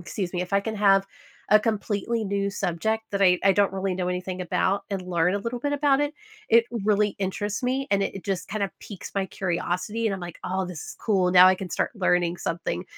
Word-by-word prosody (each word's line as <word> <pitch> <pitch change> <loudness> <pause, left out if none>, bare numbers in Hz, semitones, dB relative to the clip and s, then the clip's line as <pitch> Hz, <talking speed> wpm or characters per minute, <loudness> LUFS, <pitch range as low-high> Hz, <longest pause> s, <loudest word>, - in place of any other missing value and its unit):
excuse 175 +1 -4
me 175 - 0
if 180 - -8
I 200 - +4
can 220 +2 -4
have 195 -1 +4 0.4
a 215 - +8
completely 215 +1 -1
new 200 0 -1
subject 200 +3 -1
that 200 - -2
I 180 -2 +5
I 195 - +5
don't 200 0 +2
really 195 -1 -1
know 180 0 -2
anything 180 0 -3
about, 195 +3 0
and 195 -2 -2
learn 180 0 +1
a - - 0
little 230 +4 -4
bit 285 +4 -2
about 285 -1 +3
it, 290 0 0 0.4
it 230 0 +5 0.2
really 210 -1 +2
interests 205 +4 -2
me, 265 +2 0
and 200 -1 +3
it - - -4
it 195 - -8
just 195 -3 -3
kinda 200 -1 -2
piques 200 -4 -9
my 195 -1 +1
curiosity, 190 +5 -2
and 200 - 0
I'm 190 - -7
like, 175 -2 -8
"Oh, 190 +1 -1
this 180 -4 -7
is - - -9
cool. 190 -5 +2
Now 180 0 +9
I 185 - +5
can 185 -2 -7
start - - 0
learning 180 -2 +1
something." 170 +1 -3
195 Hz, 230 wpm, -25 LUFS, 180-210 Hz, 0.4 s, Now